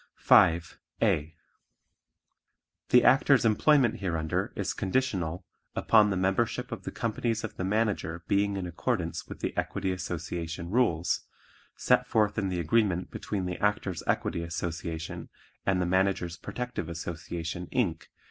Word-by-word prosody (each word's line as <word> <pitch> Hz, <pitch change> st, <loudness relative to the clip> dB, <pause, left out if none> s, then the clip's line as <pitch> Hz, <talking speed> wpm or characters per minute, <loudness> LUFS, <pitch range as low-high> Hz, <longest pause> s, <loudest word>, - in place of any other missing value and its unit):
5. 85 Hz, 0 st, +4 dB, 0.2 s
(a) 75 Hz, +2 st, +1 dB, 1.5 s
The 125 Hz, -, +6 dB
Actor's 135 Hz, -1 st, +5 dB
employment 120 Hz, +2 st, +4 dB
hereunder 80 Hz, -5 st, -1 dB
is -, -, -2 dB
conditional 95 Hz, -6 st, -1 dB, 0.3 s
upon 105 Hz, -2 st, +5 dB
the 95 Hz, -, 0 dB
membership 110 Hz, +6 st, 0 dB
of 110 Hz, -5 st, -6 dB
the -, -, -4 dB
companies 115 Hz, 0 st, -2 dB
of 110 Hz, -, -5 dB
the -, -, -4 dB
Manager 95 Hz, -5 st, -1 dB
being 100 Hz, 0 st, +1 dB
in 95 Hz, -, -3 dB
accordance 90 Hz, 0 st, -2 dB
with -, -, -9 dB
the -, -, -2 dB
Equity 95 Hz, -, -1 dB
Association 85 Hz, -1 st, -4 dB
rules, 90 Hz, -9 st, +1 dB, 0.5 s
set -, -, +2 dB
forth 105 Hz, -1 st, +2 dB
in 95 Hz, -2 st, -1 dB
the 90 Hz, -1 st, -2 dB
agreement 90 Hz, +1 st, +1 dB
between 100 Hz, -3 st, -3 dB
the 90 Hz, -1 st, -4 dB
Actors' 105 Hz, -4 st, 0 dB
Equity 85 Hz, -, 0 dB
Association 85 Hz, -1 st, -5 dB, 0.4 s
and 95 Hz, -2 st, +3 dB
the 90 Hz, -, +1 dB
Managers' 95 Hz, -1 st, +1 dB
Protective 125 Hz, -3 st, -5 dB
Association, 85 Hz, +1 st, -5 dB
Inc. 90 Hz, -10 st, -1 dB
95 Hz, 135 wpm, -28 LUFS, 85-110 Hz, 1.5 s, The